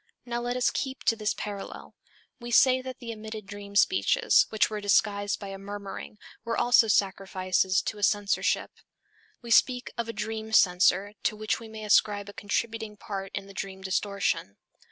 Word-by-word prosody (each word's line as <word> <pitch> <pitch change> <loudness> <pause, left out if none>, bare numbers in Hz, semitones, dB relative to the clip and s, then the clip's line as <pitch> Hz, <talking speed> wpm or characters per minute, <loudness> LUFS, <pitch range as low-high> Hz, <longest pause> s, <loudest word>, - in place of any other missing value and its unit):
Now 240 -1 -3
let 245 +1 -2
us 250 - +2
keep 265 -1 -4
to 225 - +3
this 215 -1 -1
parallel. 205 -1 -7 0.5
We 240 0 -7
say 255 +2 +5
that 260 0 -7
the 230 -2 -6
omitted 215 -1 -8
dream 200 0 -10
speeches, 200 - +4
which 220 - +2
were 215 -1 -5
disguised 205 0 +1
by 200 - -7
a 195 0 -7
murmuring, 200 +1 -7 0.3
were 230 0 -2
also 240 -1 +5
sacrifices 190 -2 +1
to 210 - -4
a - - -9
censorship. 205 0 +1 0.7
We 235 - -8
actually 230 - +8
speak 250 -1 0
of 230 -1 -2
a - - -3
dream 220 +1 -5
censor 190 0 +4
to - - 0
which 215 0 -2
we 230 - -10
may 220 0 -8
ascribe 205 -1 +2
a - - -10
contributing 220 +1 -3
part 195 -1 -6
in - - -4
the 195 - -13
dream 190 0 -6
distortion. 195 - -1
210 Hz, 180 wpm, -27 LUFS, 200-225 Hz, 0.7 s, actually